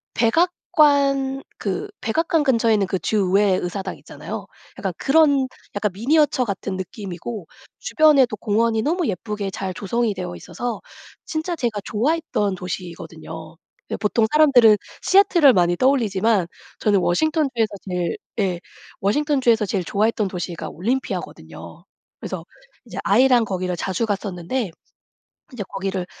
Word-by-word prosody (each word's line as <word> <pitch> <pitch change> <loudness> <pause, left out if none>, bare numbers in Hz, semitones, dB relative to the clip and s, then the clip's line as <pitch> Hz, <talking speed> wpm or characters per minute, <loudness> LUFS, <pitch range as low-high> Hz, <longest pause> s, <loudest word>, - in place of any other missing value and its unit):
백악관 275 -1 +2
그 415 +1 -3
백악관 325 +7 +1
근처에 230 -5 +3
있는 200 -2 +2
그 190 - -1
주 215 - -1 0.2
의회 200 -1 +4
의사당 185 +1 -4
있잖아요. - - -8 0.3
약간 - - -2
그런 280 -2 +3 0.3
약간 205 0 0
미니어처 270 +5 +2
같은 195 -2 -4
느낌이고 190 +1 -6 0.3
주변에도 300 - +4
공원이 220 +1 +1
너무 340 +5 0
예쁘게 205 0 -3
잘 190 -1 -4
조성이 220 +4 -1
되어 180 -1 -5
있어서 225 +7 -5 0.5
진짜 320 +2 -3
제가 230 -7 -2
좋아했던 230 - 0
도시거든요. 165 -3 -8 0.3
여 - - -1
보통 220 +2 +1
사람들은 255 -8 +6 0.3
시애틀을 360 -8 +5
많이 175 -2 +2
떠올리지만 220 -7 +2 0.3
저는 205 -2 +3
워싱턴주에서 260 - +1 0.2
제일 180 -2 -2 0.2
예. 185 -4 0 0.4
워싱턴주에서 245 -1 +2
제일 195 -2 -1
좋아했던 215 +2 +1
도시가 175 -2 -5
올림피아거든요. 245 +10 -5 0.3
그래서 - - -5 0.4
이제 - - -10
아이랑 250 -3 +4
거기를 185 -3 -2
자주 190 +5 -1
갔었는데, 200 +2 -3 0.8
이제 245 -5 -5
거기를 195 -2 -3
220 Hz, 335 characters per minute, -22 LUFS, 190-270 Hz, 0.8 s, 사람들은